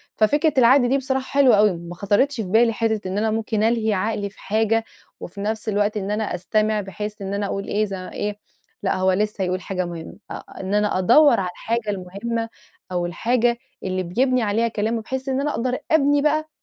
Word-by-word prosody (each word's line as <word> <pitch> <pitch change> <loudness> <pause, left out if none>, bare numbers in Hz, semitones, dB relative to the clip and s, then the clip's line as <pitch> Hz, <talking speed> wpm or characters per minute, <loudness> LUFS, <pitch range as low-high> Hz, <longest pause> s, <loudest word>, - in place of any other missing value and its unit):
ففكرة 290 +8 +2
العقل 250 0 +5
دي 270 - +3
بصراحة 265 -1 -2
حلوة 260 -5 +7
اوي 210 0 +5
ما 170 +1 -9
خطرِتش 205 +10 +1
في 225 - -2
بالي 230 +4 +4
حتة 220 -3 -1
إن 185 +2 -3
أنا 220 +1 +1
ممكن 220 -1 -1
ألهي 225 -1 +2
عقلي 205 +1 -1
في 200 - -22
حاجة، 225 +2 +1 0.4
وفي 200 +3 -8
نفس 220 +1 -2
الوقت 210 +1 +1
إن 200 0 -3
أنا 215 0 -1
أستمع 215 +3 0
بحيث 210 +2 -6
إن 195 0 -4
أنا 200 0 -1
أقول 200 0 -4
إيه 215 +1 +1
ز 200 - -7
إيه 205 +2 -4 0.4
لأ 195 - +1
هو 185 0 +2
لسه 210 +1 0
هيقول 185 0 -1
حاجة 185 -1 -3
مهمة 170 -2 -8
أ - - -3 0.3
إن 190 +1 -4
أنا 210 -2 +2
أدَوّر 240 +7 +5
على 185 -2 -1
الحاجة 225 +3 -3
المهمة 205 +4 -3 0.4
أو 175 -1 -1
الحاجة 235 +6 +1 0.3
اللي 185 0 -2
بيبني 255 +8 +1
عليها 225 +2 +1
كلامه 225 +1 -1
بحيث 265 +4 -4
إن 265 +1 0
أنا 295 +1 0
أقدر 250 0 -1
أبني 290 -2 +4
بقى 310 +1 +1
215 Hz, 200 wpm, -22 LUFS, 195-235 Hz, 0.4 s, حلوة